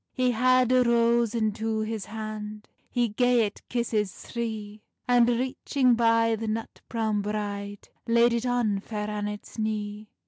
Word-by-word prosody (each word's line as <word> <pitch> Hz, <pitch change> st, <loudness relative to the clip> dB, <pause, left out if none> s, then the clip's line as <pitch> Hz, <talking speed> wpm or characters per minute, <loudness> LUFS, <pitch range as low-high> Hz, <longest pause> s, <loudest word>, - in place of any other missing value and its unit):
He 255 Hz, -1 st, +2 dB
had 255 Hz, +1 st, +3 dB
a 255 Hz, 0 st, +5 dB
rose 235 Hz, -1 st, +3 dB
into 220 Hz, 0 st, 0 dB
his 215 Hz, -2 st, -3 dB
hand, 215 Hz, -1 st, -6 dB, 0.2 s
He 245 Hz, -1 st, +1 dB
gae 245 Hz, +1 st, +3 dB
it 205 Hz, -, -7 dB
kisses 225 Hz, -4 st, 0 dB
three, 215 Hz, -2 st, -6 dB, 0.3 s
And 245 Hz, -1 st, +5 dB
reaching 255 Hz, +1 st, +1 dB
by 230 Hz, -1 st, +3 dB
the 220 Hz, 0 st, -5 dB
nut 220 Hz, +1 st, -4 dB
browne 220 Hz, -3 st, 0 dB
bride, 205 Hz, -1 st, -4 dB, 0.2 s
Laid 235 Hz, +1 st, +4 dB
it 235 Hz, +1 st, -1 dB
on 235 Hz, -5 st, +1 dB
Fair 210 Hz, 0 st, -5 dB
Annet's 210 Hz, +1 st, -5 dB
knee. 210 Hz, -1 st, -3 dB
225 Hz, 145 wpm, -27 LUFS, 210-235 Hz, 0.3 s, a